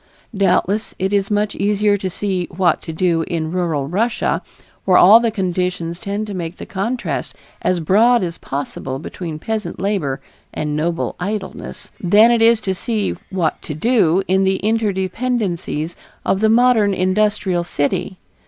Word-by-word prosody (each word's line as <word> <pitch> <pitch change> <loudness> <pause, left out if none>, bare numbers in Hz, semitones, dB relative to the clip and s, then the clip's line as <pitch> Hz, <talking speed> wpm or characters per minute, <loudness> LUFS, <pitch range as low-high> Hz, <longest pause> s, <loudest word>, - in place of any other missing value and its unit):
Doubtless 200 +2 +1
it 190 +2 -1
is 200 -1 +1
much 210 0 0
easier 205 +1 +2
to 195 -2 -3
see 185 -1 -2
"what 175 -2 +1
to - - -6
do" 165 0 +1
in 160 -2 -2
rural 165 -6 -1
Russia, 215 +8 0 0.4
where 185 -2 +4
all 210 +5 +8
the 235 -1 +1
conditions 180 -4 -2
tend 205 +1 -3
to 210 - -6
make 175 -1 -5
the - - -8
contrast 230 +6 -3 0.3
as 180 -1 +1
broad 220 +8 +4
as 170 -2 -4
possible 135 -1 -4
between 160 +2 -6
peasant 215 +5 -4
labor 180 -9 -1 0.4
and 150 -1 -2
noble 165 +2 -1
idleness, 195 +2 -5
than 210 +6 +6
it 235 -1 +2
is 230 0 +5
to 190 - -1
see 210 +2 -2
"what 175 -5 -1
to 150 - -6
do" 195 -2 +2
in 190 +1 +3
the 190 0 +1
interdependencies 200 -5 -1 0.3
of 195 - +1
the 220 +1 +3
modern 225 -4 +4
industrial 185 -1 +1
city. 180 +4 -2
190 Hz, 155 wpm, -19 LUFS, 175-210 Hz, 0.4 s, all